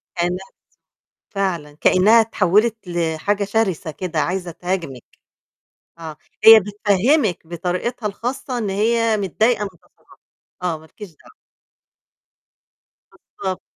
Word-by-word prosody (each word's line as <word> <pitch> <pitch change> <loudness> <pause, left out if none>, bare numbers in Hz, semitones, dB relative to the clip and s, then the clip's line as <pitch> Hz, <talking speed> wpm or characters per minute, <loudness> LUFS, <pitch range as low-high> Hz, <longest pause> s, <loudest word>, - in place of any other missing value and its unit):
كإنّها 175 0 +1
بتزوم 180 - -2 0.9
فعلًا، 170 -8 -3
كإنّها 215 +5 +5
اتحوّلت 220 +1 +2
لحاجة 175 +4 -1
شرسة 195 -6 -1
كده 170 0 -4
،عايزة 180 +3 -2
تهاجمِك. 165 -8 -4 1.0
آه، 160 -2 -8 0.3
هي 225 0 +10
بتفهِّمِك 205 - +1
بطريقتها 180 +7 -3
الخاصة 245 +5 -4
إن 215 -4 -2
هي 225 +2 +1
متضايقة 210 +4 +1
من 200 - -4
تصرفاتك 180 -4 -25 0.4
آه، 175 -3 -1
مالكيش 160 +5 -12
دعوة. 160 - -21 2.0
بالضبط. 190 -2 -3
190 Hz, 105 wpm, -20 LUFS, 170-220 Hz, 2.0 s, هي